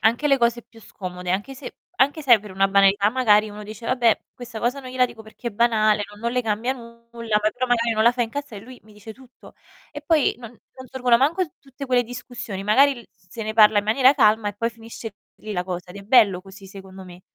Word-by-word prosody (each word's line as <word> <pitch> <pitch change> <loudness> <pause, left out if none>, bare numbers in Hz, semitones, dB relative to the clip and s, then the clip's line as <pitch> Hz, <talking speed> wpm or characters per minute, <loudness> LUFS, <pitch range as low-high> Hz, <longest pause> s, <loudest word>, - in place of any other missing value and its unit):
anche 235 +8 +2
le 275 - +3
cose 235 0 +1
più 225 0 -19
scomode, 180 -3 -7
anche 205 +9 -2
se 265 - -10 0.2
anche 285 +4 +2
se 270 -5 +6
è 220 - 0
per 210 0 -12
una 195 +1 +1
banalità 200 +1 +4
magari 215 -4 +3
uno 210 0 -10
dice: 215 +2 -10
"Vabbè, 240 -3 +2
questa 245 -2 -9
cosa 250 +4 -1
non 255 -1 -10
gliela 255 0 +2
dico 230 -2 -13
perché 220 +2 -8
è - - -8
banale, 215 -1 +2
non 205 0 -15
non 235 +1 -2
le 250 0 0
cambia 225 +3 -1
nulla, 235 -2 -5
ma 215 - +2
però 255 +3 -3
magari 235 -2 +1
non 220 - +1
la 235 +2 +5
fa 245 - -5
incazza" 240 +2 -6
e - - -8
lui 250 +4 -13
mi 215 - -19
dice 210 +2 -11
tutto. 255 0 -18 0.4
E 290 0 -9
poi 305 -1 +2
non 235 -3 -10
non 260 +2 -16
sorgono 250 -2 +2
manco 310 +9 +1
t 310 - -24
tutte 275 0 -10
quelle 250 -1 +2
discussioni, 245 -4 -8
magari 260 +6 +3
l 235 - -18
s 180 0 -33
se 225 - -7
ne 215 - -4
parla 215 -1 +6
in 205 - -1
maniera 255 +5 +4
calma 215 -3 +3
e 205 - -6
poi 230 +3 -1
finisce 225 -1 -10 0.2
lì 215 - -8
la 180 -2 -2
cosa. 180 -1 -6
Ed 185 - -11
è 200 - -9
bello 200 -4 +4
così 195 0 -14
secondo 190 -1 -12
me. 180 -1 -13
230 Hz, 255 wpm, -22 LUFS, 205-250 Hz, 0.4 s, se